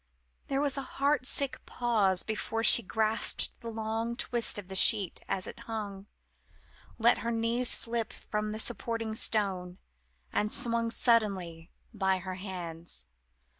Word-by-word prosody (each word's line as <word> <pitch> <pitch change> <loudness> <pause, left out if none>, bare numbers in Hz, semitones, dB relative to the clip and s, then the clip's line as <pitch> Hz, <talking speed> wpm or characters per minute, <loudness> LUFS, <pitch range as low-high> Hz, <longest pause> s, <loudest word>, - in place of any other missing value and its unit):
There 275 0 0
was 285 -1 0
a 270 - -9
heart 280 -1 +2
sick 280 -2 -1
pause 210 -7 +1
before 220 +1 -2
she 235 - +9
grasped 220 +1 0
the 235 - -6
long 225 +1 -3
twist 235 -2 -1
of 200 -3 -6
the 190 - -8
sheet 195 0 +5
as 185 - 0
it - - -7
hung 205 -3 -5 0.9
let 235 +1 +4
her 235 - -3
knees 235 +2 0
slip 230 -1 0
from 210 0 -4
the 215 - -4
supporting 225 0 -2
stone 190 -5 0 0.6
and 210 +1 +1
swung 230 -1 0
suddenly, 195 -9 +1 0.2
by 190 -3 +1
her 185 0 -6
hands. 175 -3 -7
220 Hz, 140 wpm, -30 LUFS, 195-235 Hz, 0.9 s, she